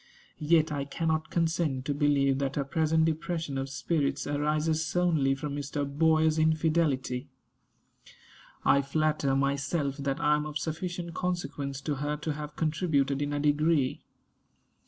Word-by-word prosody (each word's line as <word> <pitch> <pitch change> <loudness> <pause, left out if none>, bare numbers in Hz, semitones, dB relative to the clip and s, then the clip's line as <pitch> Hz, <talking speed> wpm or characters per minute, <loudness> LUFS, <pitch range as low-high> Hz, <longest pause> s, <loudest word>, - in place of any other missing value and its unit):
Yet 155 0 +3
I 145 -2 -1
cannot 160 +2 -1
consent 160 -6 0
to 145 - 0
believe 140 -2 +2
that 135 -1 -2
her 140 - 0
present 160 +2 +2
depression 160 -2 -2
of 135 0 -3
spirits 145 +1 -1
arises 150 +2 0
solely 160 -6 +1
from 140 +1 -4
Mr. 145 0 -3
Boyer's 155 +2 +3
infidelity. 155 -5 +1 1.4
I 140 - +5
flatter 150 -1 0
myself 140 +1 0
that 140 -1 -2
I 150 0 +3
am 150 0 -3
of 150 0 -3
sufficient 170 +2 -4
consequence 145 -7 -3
to 145 -1 -2
her 145 +2 -2
to 150 +1 -3
have 150 0 -7
contributed 150 -4 0
in 145 0 -1
a 145 - -1
degree. 150 -1 +2
150 Hz, 140 wpm, -29 LUFS, 140-160 Hz, 1.4 s, I